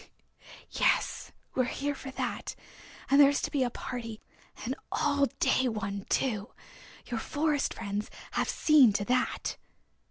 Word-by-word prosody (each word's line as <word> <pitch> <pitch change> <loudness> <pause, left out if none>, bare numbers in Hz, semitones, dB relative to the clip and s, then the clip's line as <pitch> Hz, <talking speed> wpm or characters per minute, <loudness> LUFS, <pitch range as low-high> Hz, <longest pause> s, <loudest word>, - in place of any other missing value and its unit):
"Yes, - - +1 0.2
we're 255 - +2
here 285 +3 -2
for 270 - -8
that, 265 - -4 0.6
and 280 +1 +8
there 280 - +8
is 285 - +1
to - - -1
be 285 - +1
a 250 - +2
party, 230 -2 -6 0.5
an 250 - -1 0.2
all 285 -1 +2
day 260 -1 +3
one 200 -3 -3
too. 220 -4 0 0.5
Your 235 - -3
Forest 295 +2 0
Friends 200 +1 -3 0.2
have - - 0
seen 285 -8 +6
to 205 0 0
that." 250 +2 0
255 Hz, 145 wpm, -30 LUFS, 220-280 Hz, 0.6 s, and